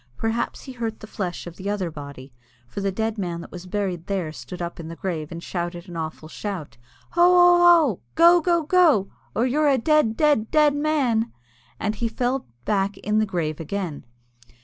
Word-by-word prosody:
Perhaps 225 +1 -2
he 265 - -8
hurt 230 -3 -4
the - - -9
flesh 185 -5 -5
of 175 -1 -9
the 200 +1 -4
other 195 -5 -2
body, 140 -3 -10 0.3
for 200 - -6
the 195 0 0
dead 220 +2 -2
man 175 -3 -3
that - - -11
was 180 0 -9
buried 185 -3 -3
there 185 -6 -2
stood 130 +4 -9
up 170 0 -5
in 165 - -7
the 165 - -7
grave, 165 -4 -4
and 170 0 -7
shouted 175 0 -4
an 175 - -9
awful 160 -1 -5
shout. 175 - -6 0.3
"Hoo! 345 - +2
hoo!! 355 0 +7 0.3
hoo!!! 220 -10 -2 0.2
Go! 340 +1 +7
go!! 340 0 +2
go!!! 310 - +4 0.2
or 235 - +2
you're 290 +4 +2
a 270 - +4
dead, 280 -3 +2
dead, 295 -8 +3
dead 300 -2 +4
man!" 275 -7 +1 0.5
And 215 - -1
then - - -13
he 235 - +1
fell 250 +3 -2 0.2
back 200 -1 0
in 215 +1 0
the 215 - +1
grave 160 -5 -2
again. 165 -2 -4
205 Hz, 200 wpm, -24 LUFS, 175-260 Hz, 0.5 s, hoo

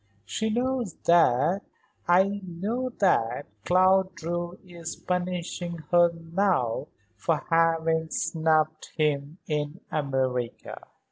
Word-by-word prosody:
She 220 - -2
knows 245 -2 -1
that 170 +2 +4 0.5
I 195 +3 +3
know 205 +9 -3
that 140 - +2 0.2
Claude 185 +1 +4
Drew 175 +1 -4
is 170 -2 -7
punishing 180 -1 -3
her 175 -1 +6
now 165 - 0 0.3
for 150 +9 -1
having 165 -1 +2
snubbed 155 -1 0
him 150 0 0
in 150 +2 -2
America." 130 -5 -2
170 Hz, 95 wpm, -27 LUFS, 155-185 Hz, 0.5 s, her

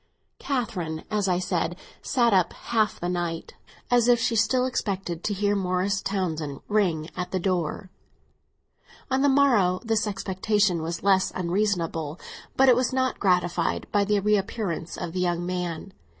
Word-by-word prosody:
Catherine, 180 - -3
as 210 -2 +1
I 180 - +2
have 180 - -1
said, 175 -1 -1 0.3
sat 240 -5 +2
up 185 -3 +3
half 220 -3 -1
the 175 - -3
night, 175 -2 -3 0.4
as 245 -1 +4
if 240 -1 +5
she 230 0 0
still 230 +4 +2
expected 195 -8 -3
to 210 - 0
hear 205 +1 +1
Morris 190 +1 0
Townsend 160 -8 -3
ring 175 -7 0
at 180 -1 -3
the 185 - -1
door. 180 0 -2 1.2
On 260 +1 +2
the 285 - +4
morrow 235 -10 +4
this 225 -2 0
expectation 195 -1 0
was 165 +1 -4
less 190 -1 +3
unreasonable; 170 -4 -1 0.4
but 265 - +5
it 250 - +7
was 250 +1 +1
not 260 0 0
gratified 180 -3 +1
by 205 -1 +3
the 205 0 +2
reappearance 195 -4 -1
of 165 - -5
the 185 - -2
young 175 -1 0
man. 180 +1 -4
190 Hz, 160 wpm, -25 LUFS, 175-215 Hz, 1.2 s, it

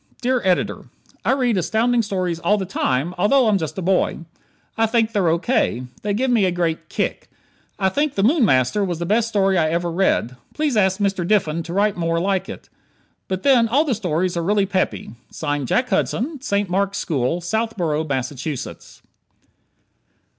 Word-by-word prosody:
_ - - -48
Dear 250 0 +1
Editor: 185 -2 0 0.4
I - - +2
read 250 -6 +1
Astounding 225 +7 +1
Stories 185 -5 -2
all 210 +4 +2
the 195 - -3
time, 165 -3 -1
although 245 +6 +4
I'm 205 -2 +3
just 155 -2 -5
a 190 - -3
boy. 185 -1 +1 0.5
I 225 0 +2
think 225 0 +1
they're 200 -5 +1
O. 165 - +3
K. 170 - 0 0.2
They 205 -1 -1
give 255 +3 0
me 230 -4 +3
a 185 - +1
great 170 -2 -2
"kick." - - -3 0.5
I 190 - +1
think 290 +7 -1
"The 195 - +1
Moon 275 +5 +4
Master" 130 - +2
was 175 -4 -2
the 170 - -3
best 215 +5 +2
story 195 -4 +2
I 155 -1 +2
ever 170 +1 -1
read. 165 -8 +1 0.2
Please 300 -4 0
ask 190 -3 +2
Mr. 195 -3 0
Diffin 170 -4 +1
to 170 +1 -7
write 205 +1 +1
more 165 -1 0
like 190 +1 -1
it. - - -9 0.6
But 190 0 -3
then 250 -4 +5
all 280 +8 +2
the 275 - +1
stories 180 -3 -1
are 170 - -1
really 200 +3 +2
peppy. 190 - -2 0.5
Jack 250 - 0
Hudson, 250 +8 -1
St. 205 -8 0
Mark's 195 +2 0
School, 155 -2 -1
Southborough, 175 -5 -1
Massachusetts. 135 0 -5
195 Hz, 185 wpm, -21 LUFS, 170-225 Hz, 0.6 s, then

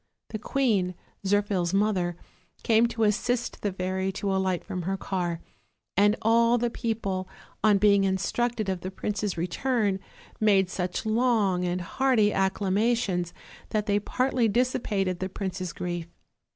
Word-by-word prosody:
The 215 - -4
queen, 210 -8 +1 0.3
Zirphil's 195 -3 +1
mother, 190 -4 +1 0.5
came 230 +1 +4
to 230 -1 -2
assist 230 +3 0
the 205 - 0
fairy 190 +1 -2
to 195 0 -1
alight 190 -2 0
from 180 - -4
her 190 +3 -2
car, 175 -4 -2 0.5
and 205 +2 +4
all 230 +2 +4
the 240 0 0
people, 200 -6 -2 0.3
on 210 -2 +5
being 200 0 +4
instructed 215 +4 0
of 190 -2 -2
the 185 - -4
prince's 205 0 -3
return, 200 +3 0 0.4
made 195 -4 +3
such 180 +3 -3
long 215 -5 +2
and 180 +1 -1
hearty 220 +2 +2
acclamations 195 -1 +1 0.4
that 210 -1 0
they 205 -1 +2
partly 250 +2 +1
dissipated 205 -6 0
the 190 - -2
prince's 185 -2 -4
grief. 175 +1 -4
200 Hz, 140 wpm, -27 LUFS, 185-225 Hz, 0.5 s, on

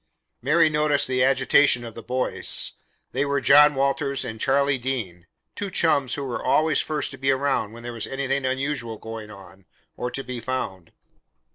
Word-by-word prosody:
Mary 155 +5 +4
noticed 150 -1 +2
the 130 -1 +1
agitation 130 -1 +3
of 115 - -8
the 115 - -9
boys. 125 +2 0 0.4
They 135 - 0
were 140 0 0
John 145 +2 +6
Walters 140 +1 0
and 110 0 -6
Charlie 140 0 +2
Dean 105 -10 -4 0.3
two 205 - -4
chums 145 -7 +2
who 140 - -4
were 130 -3 -4
always 155 -1 +2
first 150 -3 -3
to - - -11
be 135 +1 0
around 135 -5 0
when 115 +1 -12
there 120 0 -6
was 115 -2 -5
anything 135 0 -2
unusual 130 -3 -2
going 110 0 -8
on, 95 -2 -14 0.3
or 125 - -3
to 135 - -4
be 125 -2 -6
found. 100 -9 -5
130 Hz, 175 wpm, -24 LUFS, 115-140 Hz, 0.4 s, John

